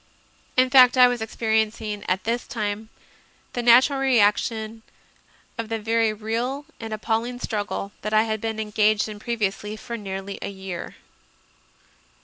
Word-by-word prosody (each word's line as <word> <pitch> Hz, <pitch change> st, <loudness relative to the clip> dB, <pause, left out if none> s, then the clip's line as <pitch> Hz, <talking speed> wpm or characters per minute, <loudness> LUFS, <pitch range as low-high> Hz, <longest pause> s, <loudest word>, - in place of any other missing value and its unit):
In 255 Hz, 0 st, +4 dB
fact, 255 Hz, -1 st, +7 dB
I 250 Hz, -1 st, +8 dB
was 245 Hz, -2 st, -2 dB
experiencing 220 Hz, -1 st, -1 dB
at 185 Hz, +1 st, 0 dB
this 235 Hz, +2 st, -2 dB
time 215 Hz, -1 st, -3 dB, 0.6 s
the 245 Hz, -, -2 dB
nat 240 Hz, +2 st, +7 dB
ural 275 Hz, -2 st, -3 dB
reaction 225 Hz, -2 st, +1 dB, 0.8 s
of 225 Hz, -1 st, -3 dB
the 225 Hz, -, -1 dB
very 225 Hz, +1 st, +1 dB
real 230 Hz, +6 st, -3 dB
and 225 Hz, -1 st, -6 dB
appalling 225 Hz, +3 st, -2 dB
struggle 205 Hz, -3 st, -3 dB
that 215 Hz, -, -3 dB
I 215 Hz, 0 st, +4 dB
had 220 Hz, -1 st, -3 dB
been 225 Hz, -1 st, -3 dB
engaged 215 Hz, 0 st, +2 dB
in 210 Hz, -1 st, -8 dB
previously 210 Hz, -2 st, -2 dB
for 235 Hz, +2 st, -6 dB
nearly 195 Hz, -1 st, -6 dB
a -, -, -3 dB
year. 190 Hz, -3 st, -7 dB
220 Hz, 145 wpm, -24 LUFS, 210-235 Hz, 0.8 s, I